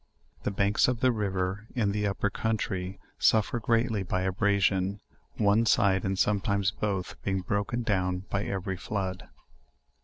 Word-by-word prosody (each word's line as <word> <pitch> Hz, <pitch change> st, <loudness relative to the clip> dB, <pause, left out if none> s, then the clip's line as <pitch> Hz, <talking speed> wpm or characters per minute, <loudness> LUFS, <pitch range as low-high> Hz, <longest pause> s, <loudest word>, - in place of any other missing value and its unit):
The -, -, -1 dB
banks 100 Hz, +1 st, +2 dB
of 125 Hz, -2 st, 0 dB
the 130 Hz, -, +4 dB
river 100 Hz, -1 st, -2 dB
in 110 Hz, -5 st, +1 dB
this 105 Hz, 0 st, 0 dB
upper 100 Hz, +1 st, -1 dB
country 95 Hz, -4 st, -2 dB, 0.2 s
suffer 110 Hz, +2 st, +3 dB
greatly 115 Hz, -1 st, +1 dB
by 95 Hz, 0 st, -1 dB
abrasion, 95 Hz, 0 st, +1 dB, 0.4 s
one 105 Hz, +2 st, +3 dB
side 100 Hz, -6 st, +3 dB
and 95 Hz, 0 st, -1 dB
sometimes 100 Hz, -1 st, +1 dB
both 100 Hz, -3 st, -3 dB
being 95 Hz, -1 st, -1 dB
broken 105 Hz, +6 st, -1 dB
down 90 Hz, -3 st, 0 dB
by 100 Hz, +1 st, 0 dB
every 95 Hz, -1 st, -3 dB
flood. 95 Hz, -1 st, -4 dB
100 Hz, 145 wpm, -28 LUFS, 95-105 Hz, 0.4 s, the